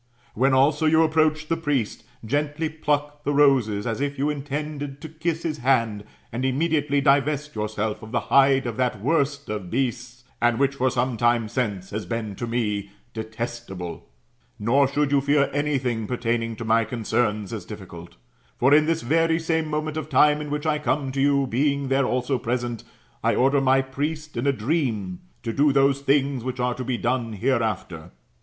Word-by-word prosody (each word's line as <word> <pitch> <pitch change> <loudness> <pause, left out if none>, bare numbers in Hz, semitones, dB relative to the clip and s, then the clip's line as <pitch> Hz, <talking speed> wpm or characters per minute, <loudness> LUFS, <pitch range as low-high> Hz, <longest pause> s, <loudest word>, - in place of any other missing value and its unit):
When 130 +3 +3
also 150 +4 +3
you 160 +1 +5
approhch 155 -1 +1
the 165 - +1
priest, 145 -9 -2 0.2
gently 145 +5 -1
pluck 145 -1 -2
the 145 0 0
roses, 125 -8 +3
as 115 +2 -2
if 145 0 -2
you 145 +3 +1
intended 145 0 -5
to 160 - -7
kiss 160 +1 -3
his 155 -3 -3
hand, 115 -5 +1 0.3
and 120 +3 -3
immediately 145 +1 +1
divest 145 +2 +2
yourself 105 0 -3
of 110 -1 -10
the 120 - 0
hide 135 -1 +5
of 120 -2 -4
that 125 -4 0
worst 140 +3 0
of 105 -4 -4
beasts, 120 0 -3 0.2
and 120 -1 +3
which 140 0 +2
for 130 -1 +1
some 125 -1 -1
time 120 -1 +2
since 105 -6 -3
has 105 +1 -4
been 115 -3 -3
to 120 - -4
me 105 -4 -1 0.2
detestable 110 -5 -6 0.5
Nor 135 +6 +3
should 145 +1 0
you 140 -1 +4
fear 140 0 +2
any 145 0 +1
thing 120 -4 -2
pertaining 115 -2 -1
to 115 - -6
my 115 +1 +3
concerns 110 -2 -1
as - - -5
diflUcult, - - -10 0.4
For 135 +3 +4
in 155 +1 +5
this 165 0 0
very 165 +5 +2
same 160 -1 -1
moment 155 0 -2
of 155 0 -4
time 150 +1 +4
in 150 - -6
which 150 +1 -3
I 155 -1 +1
come 145 -2 -1
to 135 +1 -1
you, 140 0 +3
being 140 +2 0
there 135 -1 +2
also 125 +1 0
present,' 120 -1 -3 0.4
I - - +2
order 135 +2 +3
my 135 0 +3
priest 150 +3 -4
in 120 +4 -1
a - - +5
dream 115 - -1 0.2
to 115 - -3
do 145 +3 +3
those 140 0 +3
things 140 -2 +1
which 130 0 -4
are 125 0 +1
to 130 - -5
be 125 -1 -2
done 120 -2 -1
hereafter. 110 -8 -1
135 Hz, 185 wpm, -24 LUFS, 115-145 Hz, 0.5 s, you